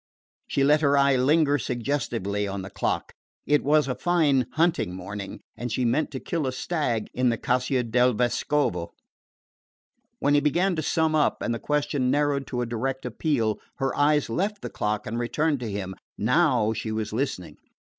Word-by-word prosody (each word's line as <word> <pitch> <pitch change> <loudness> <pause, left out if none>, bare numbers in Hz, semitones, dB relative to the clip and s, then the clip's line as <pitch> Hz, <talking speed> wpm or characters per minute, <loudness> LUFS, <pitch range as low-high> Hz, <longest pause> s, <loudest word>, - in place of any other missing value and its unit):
She 135 - +1
let 150 +2 +4
her 140 -1 +3
eye 140 -1 +4
linger 145 +3 +3
suggestively 115 -6 -2
on 100 -1 -4
the 95 - -8
clock. - - -2 0.3
It 150 -1 +2
was 150 0 +3
a 130 - 0
fine 145 -7 +2
hunting 160 - +1
morning, 100 +2 -7
and 120 -1 -5
she 130 - -1
had 120 - +2
meant 155 +6 +1
to 135 - -5
kill 160 -2 -2
a - - 0
stag 130 -6 -1
in 125 0 +2
the 115 - 0
Caccia 125 +1 0
del 125 +2 +3
Vescovo. 120 -6 0 1.2
When 145 - +1
he 145 - +6
began 175 +6 +1
to 155 - -1
sum 160 +1 +1
up, 155 -1 +1
and 120 - 0
the 115 - -3
question 145 -3 0
narrowed 145 0 +1
to 125 -2 -2
a - - -2
direct 130 +3 -3
appeal, 120 -3 0 0.2
her 135 -2 -1
eyes 150 0 +3
left 200 - -2
the - - -5
clock 105 0 -2
and 115 +3 -3
returned 145 +4 0
to 120 -3 -4
him. 100 -2 -4 0.2
Now 125 -2 +2
she 110 0 -4
was 110 -1 -3
listening. 120 -7 -3
130 Hz, 185 wpm, -25 LUFS, 115-150 Hz, 1.2 s, he